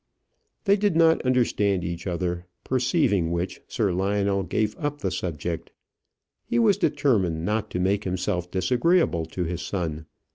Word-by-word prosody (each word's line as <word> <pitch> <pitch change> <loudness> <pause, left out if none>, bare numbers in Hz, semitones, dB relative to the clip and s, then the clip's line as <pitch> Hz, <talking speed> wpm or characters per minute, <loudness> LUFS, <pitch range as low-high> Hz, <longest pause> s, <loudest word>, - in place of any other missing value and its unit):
They 200 -1 +4
did 205 -4 +1
not 165 0 +5
understand 105 -7 +1
each 85 +1 -4
other; 90 0 -2 0.2
perceiving 125 - +1
which, 85 +2 -3
Sir 110 -6 0
Lionel 100 +1 +1
gave 105 +4 -1
up 145 -2 -2
the 95 - -1
subject. 85 -2 -4 0.7
He 240 - -1
was 215 -4 +4
determined 95 - +1
not 105 +1 -1
to 90 - -3
make 100 +3 +1
himself 90 -1 -2
disagreeable 95 - +2
to 90 - -3
his 85 +1 -3
son. 80 -5 -3
95 Hz, 145 wpm, -25 LUFS, 90-130 Hz, 0.7 s, not